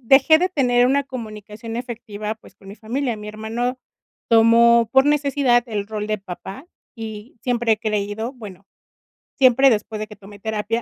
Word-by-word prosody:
dejé 270 Hz, +6 st, +6 dB
de 365 Hz, +2 st, +1 dB
tener 245 Hz, -7 st, +2 dB
una 280 Hz, +2 st, +2 dB
comunicación 225 Hz, -3 st, -8 dB
efectiva 225 Hz, -3 st, -5 dB
pues, 220 Hz, -, -19 dB
con 195 Hz, -, -17 dB
mi 200 Hz, -, -10 dB
familia. 240 Hz, +3 st, -3 dB
Mi 210 Hz, -, -9 dB
hermano 230 Hz, +4 st, -3 dB, 0.5 s
tomó 230 Hz, 0 st, +5 dB
por 265 Hz, 0 st, +6 dB
necesidad 280 Hz, -4 st, +2 dB
el 210 Hz, -3 st, -3 dB
rol 210 Hz, -1 st, -4 dB
de 215 Hz, -, -1 dB
papá, 195 Hz, -, -9 dB, 0.3 s
y 220 Hz, 0 st, -8 dB
siempre 240 Hz, -2 st, +1 dB
he 215 Hz, -, 0 dB
creído 215 Hz, +2 st, -2 dB
bueno, 205 Hz, -7 st, -11 dB, 0.7 s
siempre 265 Hz, 0 st, +6 dB
después 215 Hz, 0 st, -2 dB
de 215 Hz, -, -3 dB
que 210 Hz, -, -12 dB
tomé 205 Hz, 0 st, -14 dB
terapia, 220 Hz, +2 st, -2 dB
230 Hz, 165 wpm, -21 LUFS, 210-250 Hz, 0.7 s, dejé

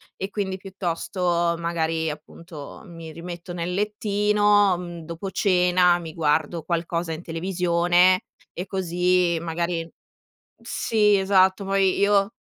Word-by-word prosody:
e 195 Hz, -, -5 dB
quindi 195 Hz, -2 st, -3 dB
piuttosto 175 Hz, -2 st, -1 dB
magari, 165 Hz, -1 st, -1 dB
appunto, 155 Hz, 0 st, -10 dB
mi 165 Hz, -2 st, -10 dB
rimetto 170 Hz, +2 st, -8 dB
nel 175 Hz, +1 st, -3 dB
lettino, 205 Hz, -1 st, +2 dB
mhmm, 175 Hz, -1 st, -7 dB
dopo 170 Hz, +4 st, -6 dB
cena, 180 Hz, -2 st, +3 dB
mi 165 Hz, -2 st, -8 dB
guardo 155 Hz, +1 st, 0 dB
qualcosa 170 Hz, 0 st, -2 dB
in 160 Hz, +1 st, -5 dB
televisione 175 Hz, +1 st, +2 dB, 0.3 s
e 180 Hz, -, -5 dB
così 180 Hz, -2 st, +1 dB
magari 170 Hz, 0 st, -3 dB, 0.7 s
sì 215 Hz, -3 st, +2 dB
esatto, 190 Hz, 0 st, +3 dB
poi 195 Hz, -1 st, +2 dB
io, 200 Hz, +1 st, +3 dB
180 Hz, 115 wpm, -24 LUFS, 170-195 Hz, 0.7 s, cena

